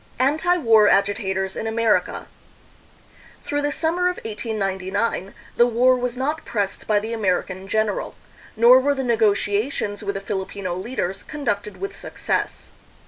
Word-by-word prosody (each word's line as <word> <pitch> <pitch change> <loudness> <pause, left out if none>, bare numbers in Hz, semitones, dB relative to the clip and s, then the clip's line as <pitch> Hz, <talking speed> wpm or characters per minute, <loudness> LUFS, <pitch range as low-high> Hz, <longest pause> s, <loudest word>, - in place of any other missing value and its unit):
Anti 315 +7 +2
War 225 -8 +5
Agitators 190 -1 +1
in 225 - -3
America. 225 -1 +1 1.2
Through 290 0 -1
the 290 0 0
sum 320 +3 -1
mer 360 0 +3
of 360 - -3
1899 200 -2 -2 0.2
the 240 - +6
war 245 +2 +4
was 250 0 -3
not 295 +5 -2
pressed 205 -4 -3
by 215 - +3
the 220 +3 -2
American 190 -2 -1
general, 215 0 -1 0.4
nor 240 +3 +7
were 285 +2 +1
the 270 - -2
negotiations 210 -1 0
with 200 -1 -3
the - - -2
Filipino 190 -2 -4
leaders 195 -1 -3
conducted 235 -9 -3
with 395 0 -5
success. - - -3
220 Hz, 140 wpm, -22 LUFS, 200-255 Hz, 1.2 s, nor